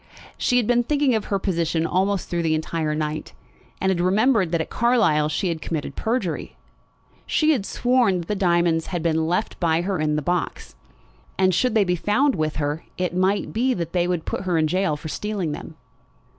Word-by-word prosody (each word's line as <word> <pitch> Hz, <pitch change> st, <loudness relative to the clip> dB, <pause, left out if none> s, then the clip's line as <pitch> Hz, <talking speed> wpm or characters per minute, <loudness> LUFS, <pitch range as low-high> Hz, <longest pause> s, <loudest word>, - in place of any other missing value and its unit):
She 250 Hz, -, +1 dB
had 245 Hz, -, +2 dB
been 240 Hz, +2 st, +3 dB
thinking 285 Hz, +1 st, +1 dB
of 220 Hz, -2 st, 0 dB
her 200 Hz, -, 0 dB
position 170 Hz, -4 st, 0 dB
almost 190 Hz, +2 st, 0 dB
through 175 Hz, -1 st, -1 dB
the 160 Hz, -1 st, +1 dB
entire 155 Hz, -1 st, -2 dB
night, 155 Hz, 0 st, -3 dB, 0.5 s
and 190 Hz, -, +1 dB
had 175 Hz, -2 st, 0 dB
remembered 195 Hz, 0 st, +3 dB
that 170 Hz, -, +1 dB
at 160 Hz, -, -4 dB
Carlisle 225 Hz, -11 st, +2 dB
she 175 Hz, +4 st, -1 dB
had 165 Hz, -2 st, -3 dB
committed 150 Hz, -4 st, -4 dB
perjury. 220 Hz, -8 st, -2 dB, 0.7 s
She 310 Hz, 0 st, +3 dB
had 235 Hz, -10 st, 0 dB
sworn 245 Hz, -6 st, +2 dB
that 165 Hz, -, -10 dB
the -, -, -1 dB
diamonds 170 Hz, -3 st, +2 dB
had 175 Hz, -3 st, -3 dB
been 160 Hz, -1 st, +1 dB
left 180 Hz, +6 st, -1 dB
by 165 Hz, -2 st, +2 dB
her 190 Hz, 0 st, -2 dB
in 150 Hz, -1 st, +1 dB
the 150 Hz, -, -1 dB
box. 175 Hz, +4 st, -2 dB, 0.6 s
And 185 Hz, -1 st, +3 dB
should 245 Hz, +6 st, +1 dB
they 215 Hz, -, +5 dB
be 180 Hz, -2 st, 0 dB
found 255 Hz, -, +2 dB
with 155 Hz, -4 st, -1 dB
her 150 Hz, +1 st, -2 dB
it 180 Hz, -1 st, -2 dB
might 190 Hz, +2 st, +1 dB
be 250 Hz, +3 st, +1 dB
that 170 Hz, -2 st, -4 dB
they 175 Hz, -1 st, +1 dB
would 175 Hz, -3 st, -2 dB
put -, -, -3 dB
her 180 Hz, -3 st, 0 dB
in 160 Hz, -, +3 dB
gaol 180 Hz, -1 st, 0 dB
for 155 Hz, -, -8 dB
stealing 195 Hz, -1 st, -3 dB
them. 155 Hz, +2 st, -7 dB
180 Hz, 205 wpm, -23 LUFS, 160-210 Hz, 0.7 s, they